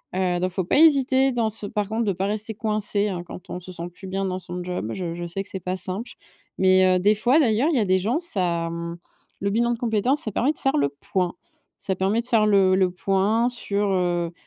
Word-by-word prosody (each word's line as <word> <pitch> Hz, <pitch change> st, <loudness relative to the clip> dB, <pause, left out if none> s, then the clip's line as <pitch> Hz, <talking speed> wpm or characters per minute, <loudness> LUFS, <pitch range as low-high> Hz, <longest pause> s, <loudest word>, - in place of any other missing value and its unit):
Heu, 180 Hz, -2 st, 0 dB
donc 185 Hz, +1 st, 0 dB
faut 185 Hz, +1 st, -2 dB
pas 280 Hz, -, +2 dB
hésiter 270 Hz, -4 st, +5 dB
dans 230 Hz, -3 st, 0 dB
ce 210 Hz, -1 st, -4 dB
par 210 Hz, -1 st, -2 dB
contre 230 Hz, +1 st, -1 dB
de 200 Hz, -, +1 dB
pas 190 Hz, +2 st, -2 dB
rester 215 Hz, +1 st, -2 dB
coincé 210 Hz, -1 st, 0 dB
hein, 180 Hz, -2 st, -4 dB
quand 175 Hz, -, -11 dB
on 180 Hz, -, -4 dB
se 185 Hz, +1 st, -8 dB
sent 170 Hz, 0 st, -5 dB
plus 190 Hz, -, -10 dB
bien 195 Hz, +1 st, -2 dB
dans 185 Hz, -1 st, -2 dB
son 180 Hz, 0 st, -6 dB
job, 180 Hz, -11 st, -4 dB
je 175 Hz, -3 st, -4 dB
je 175 Hz, -, -5 dB
sais 195 Hz, +3 st, -4 dB
que -, -, -11 dB
c'est 190 Hz, -, -5 dB
pas 185 Hz, +2 st, -3 dB
simple. 190 Hz, +6 st, -3 dB, 0.5 s
Mais, 185 Hz, 0 st, +5 dB
heu, -, -, 0 dB
des 205 Hz, +3 st, +3 dB
fois 245 Hz, +8 st, +3 dB
d'ailleurs, 245 Hz, +1 st, +2 dB
il 285 Hz, -, +1 dB
y -, -, +3 dB
a 215 Hz, -, +1 dB
des 185 Hz, 0 st, +2 dB
gens, 230 Hz, -, 0 dB
ça, 175 Hz, -, -1 dB
mmh, 170 Hz, 0 st, -5 dB, 0.4 s
le 200 Hz, -, 0 dB
bilan 235 Hz, +3 st, +1 dB
de 235 Hz, -, -6 dB
compétence, 240 Hz, +4 st, +1 dB
ça 215 Hz, -, -4 dB
permet 260 Hz, +8 st, +2 dB
de -, -, -12 dB
faire 270 Hz, -, +1 dB
le 140 Hz, -1 st, +2 dB
point. 175 Hz, +5 st, -2 dB, 0.5 s
Ça 190 Hz, -, -2 dB
permet 195 Hz, +4 st, +1 dB
de -, -, -12 dB
faire 225 Hz, -4 st, +3 dB
le 195 Hz, -2 st, +4 dB
le 190 Hz, -1 st, +3 dB
point 195 Hz, +5 st, +1 dB
sur, 205 Hz, -4 st, -1 dB
heu 175 Hz, -2 st, 0 dB
195 Hz, 255 wpm, -23 LUFS, 180-225 Hz, 0.5 s, hésiter